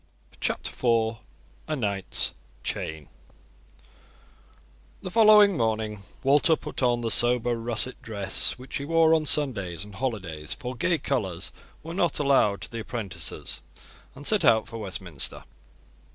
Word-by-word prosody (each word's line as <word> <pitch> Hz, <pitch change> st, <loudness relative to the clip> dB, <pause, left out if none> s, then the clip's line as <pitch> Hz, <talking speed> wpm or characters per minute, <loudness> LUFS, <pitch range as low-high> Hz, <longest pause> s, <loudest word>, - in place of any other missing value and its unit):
CHAPTER -, -, -1 dB
IV: 115 Hz, -2 st, +1 dB, 0.5 s
A 155 Hz, -, -1 dB
KNIGHT'S 100 Hz, -7 st, -2 dB, 0.3 s
CHAIN 80 Hz, -2 st, -4 dB, 2.0 s
The 185 Hz, -, -5 dB
following 210 Hz, -2 st, +7 dB
morning 110 Hz, -4 st, -1 dB, 0.2 s
Walter 145 Hz, +4 st, +5 dB
put -, -, -7 dB
on 120 Hz, -2 st, +2 dB
the 115 Hz, -1 st, 0 dB
sober 120 Hz, 0 st, +4 dB
russet 120 Hz, +2 st, -1 dB
dress 100 Hz, -2 st, -1 dB
which 125 Hz, +1 st, -5 dB
he 140 Hz, -, -5 dB
wore 165 Hz, +1 st, +4 dB
on 155 Hz, -2 st, +2 dB
Sundays 100 Hz, -, +1 dB
and 105 Hz, -, -13 dB
holidays, 95 Hz, -, -3 dB
for 130 Hz, -2 st, -6 dB
gay 170 Hz, +8 st, +1 dB
colours 95 Hz, -, -2 dB, 0.3 s
were 165 Hz, +1 st, -6 dB
not 175 Hz, -2 st, +1 dB
allowed 135 Hz, -8 st, +3 dB
to -, -, -7 dB
the 115 Hz, -, -5 dB
apprentices, 105 Hz, -7 st, -5 dB, 0.5 s
and 140 Hz, +2 st, -10 dB
set 215 Hz, -2 st, +2 dB
out 110 Hz, -1 st, +4 dB
for 115 Hz, -, -7 dB
Westminster. 90 Hz, -8 st, -6 dB
120 Hz, 135 wpm, -26 LUFS, 100-145 Hz, 2.0 s, following